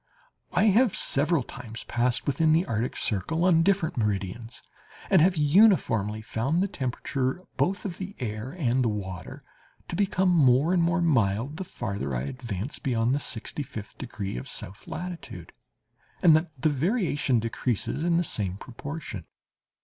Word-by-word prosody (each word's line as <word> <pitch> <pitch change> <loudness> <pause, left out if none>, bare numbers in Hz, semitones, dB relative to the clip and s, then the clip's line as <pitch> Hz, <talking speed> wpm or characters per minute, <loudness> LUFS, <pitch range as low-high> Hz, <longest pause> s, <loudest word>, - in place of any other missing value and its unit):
I - - +2
have 220 +2 +4
several 145 +1 +2
times 115 -4 -9
passed 120 0 0
within 155 +3 +3
the 160 - +4
Antarctic 120 - -2
circle, 160 - 0
on 170 -3 +5
different 190 -4 +1
meridians, 105 +2 -3 0.5
and 185 - +6
have 180 +1 +4
uniformly 145 - +3
found 135 - 0
the - - +1
temperature, 130 +1 -2
both 195 +3 0
of 185 -4 -5
the 195 +2 -6
air 110 -1 -4
and 130 -7 +1
the 115 - +2
water, 95 -5 -6 0.5
to - - -3
become 190 -1 +2
more 145 0 +4
and 180 - +3
more 170 +1 +2
mild 125 -1 +1
the 190 - -3
farther 100 - -4
I - - -1
advanced 115 - -5
beyond 120 -3 +1
the 140 - +1
sixty 135 +1 -4
fifth 110 -6 -8
degree 110 - -5
of 60 - -6
south 95 +3 -5
latitude, 175 +1 -7 0.7
and 165 -4 +8
that 160 +2 +1
the 155 - +3
variation 150 - +1
decreases 115 +5 -2
in 170 0 +2
the 175 - +2
same 100 - -1
proportion. 130 - -7
135 Hz, 155 wpm, -27 LUFS, 110-170 Hz, 0.7 s, and